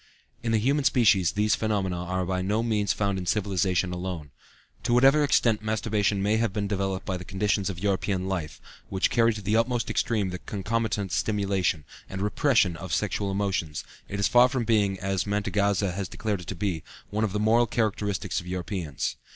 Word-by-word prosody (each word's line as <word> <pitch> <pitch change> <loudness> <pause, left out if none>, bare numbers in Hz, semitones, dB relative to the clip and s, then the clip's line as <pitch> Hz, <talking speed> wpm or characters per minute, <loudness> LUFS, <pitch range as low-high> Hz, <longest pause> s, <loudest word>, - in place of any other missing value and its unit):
In 115 - -1
the 110 - +3
human 140 +7 +1
species 105 -10 +4
these 105 0 +2
phenomena 100 -4 0
are 90 +1 -2
by 90 +1 -1
no 105 +4 0
means 105 -3 +1
found 100 -2 0
in 90 - -6
civilization 95 -3 +1
alone. 90 -5 -5 0.5
To 120 0 +1
whatever 135 +4 +6
extent 115 -6 +3
masturbation 105 -2 0
may 105 +2 +2
have 115 -2 +1
been 100 0 -2
developed 95 -2 -2
by 95 - -2
the 90 - -8
conditions 100 +1 0
of 95 - -5
European 95 0 -1
life, 90 -6 -3 0.3
which 95 -1 +1
carry 115 0 +4
to 105 -2 -6
the 105 +3 +1
utmost 115 +1 +1
extreme 105 -5 0
the 90 - -5
concomitant 105 -1 -2
stimulation, 95 -5 0 0.2
and 95 - -5
repression 105 - +2
of 90 +3 -7
the - - +1
sexual 100 - -1
emotions, 95 -6 -2 0.3
it 100 - -4
is 100 - +3
far 125 +1 +6
from 125 -2 -1
being, 105 -4 +2
as 95 +1 -1
Mantegazza 100 -1 +1
has 95 0 -4
declared 105 -4 -3
it 85 - -12
to 95 - -4
be, 90 -3 -2 0.3
one 105 +2 0
of 110 - 0
the 105 - -1
moral 115 +3 +4
characteristics 105 -5 -1
of 90 - -10
Europeans. 90 -5 -3
100 Hz, 190 wpm, -26 LUFS, 95-110 Hz, 0.5 s, whatever